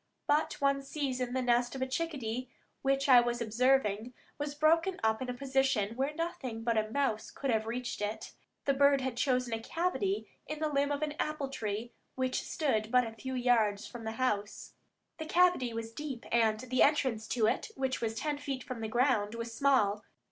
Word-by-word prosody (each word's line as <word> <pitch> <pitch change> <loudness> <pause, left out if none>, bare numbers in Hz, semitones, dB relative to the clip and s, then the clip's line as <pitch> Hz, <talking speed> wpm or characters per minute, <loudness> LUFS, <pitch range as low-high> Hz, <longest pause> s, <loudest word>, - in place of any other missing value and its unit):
But 295 +2 +1
one 275 -1 +2
season 260 -3 -3
the 260 0 0
nest 245 +1 +2
of 265 - -5
a - - +1
chickadee 260 -5 -3 0.3
which 275 0 +1
I 250 -3 +8
was 240 0 -1
observing 235 -1 +1 0.2
was 290 0 -3
broken 330 +5 +3
up 220 +1 +2
in 255 - -3
a - - -1
position 265 -5 +1
where 270 +3 0
nothing 315 -9 -4
but 230 0 +1
a 215 0 +1
mouse 245 -3 -1
could 275 -2 -2
have 220 -1 0
reached 240 -1 -3
it. 210 +1 -4 0.3
The 275 - +3
bird 280 0 +4
had 260 -2 -2
chosen 250 -2 +1
a 225 - -2
cavity 365 - -1 0.2
in 305 - -4
the 310 0 -1
limb 285 0 +1
of 290 +1 -1
an 300 -1 -1
apple 305 -3 -2
tree 220 -2 -4 0.2
which 260 0 0
stood 220 -8 -1
but 250 -1 +5
a 225 - -5
few 260 +4 -6
yards 230 -5 +2
from 240 -1 -9
the 220 0 -3
house. 210 -5 -2 0.5
The 315 - -5
cavity 350 -8 +3
was 225 0 -5
deep, 280 -4 -6
and 225 -2 +3
the 255 0 0
entrance 260 -7 +3
to 230 -3 +1
it, 220 - 0
which 265 -3 -1
was 225 -1 -1
ten 295 +4 -2
feet 270 -3 -4
from 255 -4 -6
the 220 - -2
ground, 230 -2 +1
was 230 0 -5
small. 225 -6 +2
255 Hz, 200 wpm, -31 LUFS, 225-280 Hz, 0.5 s, I